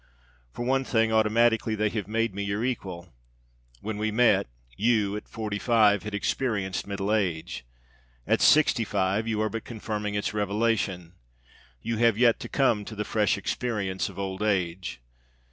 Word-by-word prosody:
For 120 Hz, -, -5 dB
one 135 Hz, +1 st, +2 dB
thing, 115 Hz, -3 st, +1 dB
automatically 110 Hz, 0 st, +3 dB
they 110 Hz, 0 st, +1 dB
have 105 Hz, -2 st, -4 dB
made 115 Hz, 0 st, 0 dB
me 100 Hz, -, -4 dB
your 100 Hz, +3 st, -1 dB
equal. 95 Hz, -8 st, -5 dB, 0.7 s
When 110 Hz, -1 st, -4 dB
we 110 Hz, +1 st, 0 dB
met, 110 Hz, -, +3 dB, 0.3 s
you, 105 Hz, -2 st, +1 dB
at 105 Hz, -, -7 dB
forty 105 Hz, -2 st, -4 dB
five, 105 Hz, -4 st, +4 dB
had 105 Hz, 0 st, -5 dB
experienced 100 Hz, -4 st, -1 dB
middle 100 Hz, +1 st, -2 dB
age. 80 Hz, -, -2 dB, 0.6 s
At -, -, +1 dB
sixty 150 Hz, -6 st, +5 dB
five 100 Hz, +1 st, 0 dB
you 110 Hz, -2 st, -1 dB
are 110 Hz, -, 0 dB
but 115 Hz, +1 st, -5 dB
confirming 105 Hz, -2 st, -4 dB
its 100 Hz, -1 st, -1 dB
revelation. 100 Hz, -4 st, -1 dB, 0.7 s
You 115 Hz, -1 st, -2 dB
have 115 Hz, -2 st, +3 dB
yet 120 Hz, -1 st, +4 dB
to -, -, -7 dB
come 120 Hz, -7 st, +2 dB
to 110 Hz, -, -8 dB
the 105 Hz, 0 st, -3 dB
fresh 105 Hz, -1 st, +1 dB
experience 100 Hz, -2 st, -2 dB
of -, -, -13 dB
old 95 Hz, 0 st, -4 dB
age. 90 Hz, -, -1 dB
105 Hz, 160 wpm, -27 LUFS, 100-115 Hz, 0.7 s, sixty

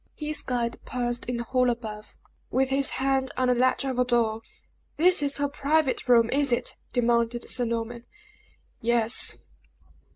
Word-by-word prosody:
His 305 Hz, 0 st, -1 dB
guide 240 Hz, -2 st, -2 dB
paused 240 Hz, -1 st, -2 dB
in 245 Hz, -, -1 dB
the 235 Hz, -, -2 dB
hall 250 Hz, +1 st, +1 dB
above, 215 Hz, -3 st, -6 dB, 0.3 s
with 265 Hz, 0 st, +1 dB
his 270 Hz, 0 st, +1 dB
hand 265 Hz, 0 st, 0 dB
on 255 Hz, -1 st, +2 dB
the -, -, +5 dB
latch 255 Hz, +2 st, +1 dB
of 260 Hz, -2 st, -2 dB
a -, -, +5 dB
door. 230 Hz, -3 st, +1 dB, 0.6 s
"This 360 Hz, +1 st, +4 dB
is 285 Hz, -1 st, -1 dB
her 285 Hz, 0 st, 0 dB
private 285 Hz, -1 st, 0 dB
room, 235 Hz, -2 st, +5 dB
is 280 Hz, -1 st, +2 dB
it!" 240 Hz, -, 0 dB, 0.2 s
demanded 235 Hz, -1 st, +1 dB
Sir 245 Hz, -, +2 dB
Norman. 235 Hz, +1 st, -4 dB, 0.7 s
"Yes." 235 Hz, 0 st, +1 dB
250 Hz, 160 wpm, -26 LUFS, 235-270 Hz, 0.7 s, the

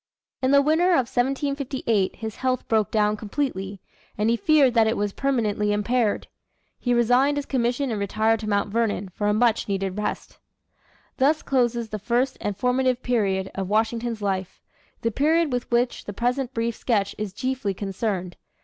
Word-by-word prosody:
In 260 Hz, -, +2 dB
the 280 Hz, 0 st, +5 dB
winter 320 Hz, +5 st, +3 dB
of 265 Hz, -7 st, +3 dB
1758 265 Hz, -5 st, 0 dB
his 220 Hz, -2 st, -6 dB
health 255 Hz, -1 st, -1 dB
broke 220 Hz, -2 st, +2 dB
down 210 Hz, -1 st, +2 dB
completely, 205 Hz, -4 st, -3 dB, 0.4 s
and 215 Hz, +2 st, +2 dB
he -, -, +3 dB
feared 275 Hz, +1 st, +4 dB
that 225 Hz, -2 st, +4 dB
it 225 Hz, -, 0 dB
was 205 Hz, -1 st, -1 dB
permanently 215 Hz, -6 st, 0 dB
impaired. 210 Hz, +1 st, 0 dB, 0.5 s
He 245 Hz, -, -1 dB
resigned 245 Hz, +4 st, +3 dB
his 290 Hz, -, -2 dB
commission 250 Hz, +1 st, 0 dB
and 215 Hz, -, -2 dB
retired 220 Hz, +3 st, +1 dB
to 215 Hz, -1 st, -4 dB
Mount 200 Hz, 0 st, +1 dB
Vernon 210 Hz, -3 st, 0 dB
for 205 Hz, +3 st, -3 dB
a 210 Hz, -, +3 dB
much 230 Hz, 0 st, +2 dB
needed 195 Hz, 0 st, -2 dB
rest. 210 Hz, -, -4 dB, 0.8 s
Thus 290 Hz, +4 st, +2 dB
closes 240 Hz, -3 st, 0 dB
the 215 Hz, -, -4 dB
first 245 Hz, +5 st, 0 dB
and 205 Hz, -2 st, -3 dB
formative 255 Hz, +2 st, +1 dB
period 195 Hz, -6 st, 0 dB
of 190 Hz, -1 st, -4 dB
Washington's 225 Hz, +1 st, 0 dB
life 190 Hz, -2 st, -2 dB, 0.4 s
the 230 Hz, -, 0 dB
period 310 Hz, +4 st, +2 dB
with 245 Hz, -1 st, -2 dB
which 240 Hz, +1 st, 0 dB
the 205 Hz, -, -6 dB
present 245 Hz, +4 st, -1 dB
brief 230 Hz, -2 st, -2 dB
sketch 200 Hz, -5 st, 0 dB
is 210 Hz, -2 st, -3 dB
chiefly 250 Hz, -1 st, -2 dB
concerned. 195 Hz, -2 st, -3 dB
230 Hz, 170 wpm, -24 LUFS, 205-255 Hz, 0.8 s, the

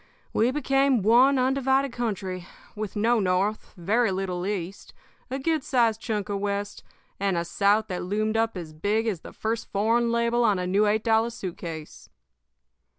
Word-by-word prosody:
We 225 Hz, +3 st, +3 dB
became 270 Hz, -3 st, +2 dB
one 250 Hz, +6 st, +5 dB
undivided. 265 Hz, +1 st, +2 dB
country, 190 Hz, -6 st, -3 dB, 0.3 s
with 210 Hz, -2 st, -5 dB
no 225 Hz, +3 st, +2 dB
North, 195 Hz, +3 st, -1 dB
very 215 Hz, +7 st, +1 dB
little 185 Hz, -1 st, -3 dB
East, 195 Hz, -2 st, -5 dB, 0.3 s
a 265 Hz, -, -2 dB
good 310 Hz, +1 st, 0 dB
sized 230 Hz, -6 st, +1 dB
chunk 210 Hz, -4 st, -2 dB
of 200 Hz, -1 st, -2 dB
West, 205 Hz, 0 st, -3 dB, 0.4 s
and 195 Hz, -2 st, 0 dB
a 170 Hz, -, -1 dB
South 205 Hz, +4 st, +2 dB
that 180 Hz, -, -3 dB
loomed 215 Hz, +4 st, -1 dB
up 225 Hz, -2 st, 0 dB
as 160 Hz, -3 st, -7 dB
big 205 Hz, +8 st, 0 dB
as 210 Hz, -7 st, -1 dB
the -, -, -11 dB
first 225 Hz, +1 st, -3 dB
foreign 230 Hz, +4 st, +2 dB
label 235 Hz, +1 st, +1 dB
on 210 Hz, -4 st, +3 dB
a 180 Hz, -, -2 dB
new 200 Hz, +4 st, +2 dB
eight 215 Hz, +1 st, +1 dB
dollar 225 Hz, 0 st, +3 dB
suit 190 Hz, -7 st, -6 dB
case. 160 Hz, -3 st, -8 dB
215 Hz, 170 wpm, -26 LUFS, 195-235 Hz, 0.4 s, one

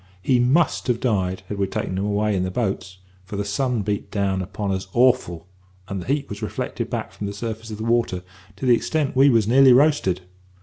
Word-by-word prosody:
He 125 Hz, +5 st, +3 dB
must 140 Hz, +7 st, +2 dB
have 120 Hz, -2 st, +1 dB
died, 95 Hz, -7 st, -1 dB
had 105 Hz, -, -5 dB
we 100 Hz, -, +1 dB
taken 95 Hz, -, -3 dB
him 95 Hz, +2 st, -1 dB
away 105 Hz, 0 st, 0 dB
in 95 Hz, -, 0 dB
the 95 Hz, -, -1 dB
boats, 95 Hz, -3 st, -3 dB, 0.3 s
for 95 Hz, +2 st, -8 dB
the 100 Hz, 0 st, -2 dB
sun 120 Hz, +2 st, -1 dB
beat 105 Hz, 0 st, -3 dB
down 100 Hz, -2 st, 0 dB
upon 100 Hz, +2 st, -3 dB
us 95 Hz, 0 st, -3 dB
awful, 120 Hz, -10 st, +2 dB, 0.4 s
and 100 Hz, -2 st, -4 dB
the -, -, -10 dB
heat 140 Hz, +1 st, 0 dB
was 105 Hz, +1 st, -7 dB
reflected 110 Hz, -, -4 dB
back -, -, -4 dB
from 100 Hz, -, -6 dB
the 100 Hz, -, -5 dB
surface 110 Hz, +1 st, -5 dB
of 105 Hz, -, -6 dB
the 110 Hz, -, -5 dB
water 115 Hz, -6 st, 0 dB, 0.3 s
to 100 Hz, -, -6 dB
that 125 Hz, -, +6 dB
extent 145 Hz, +4 st, 0 dB
we 135 Hz, +2 st, +6 dB
was 115 Hz, -5 st, +3 dB
nearly 130 Hz, +2 st, +7 dB
roasted. 135 Hz, -, +3 dB
105 Hz, 220 wpm, -22 LUFS, 95-125 Hz, 0.4 s, nearly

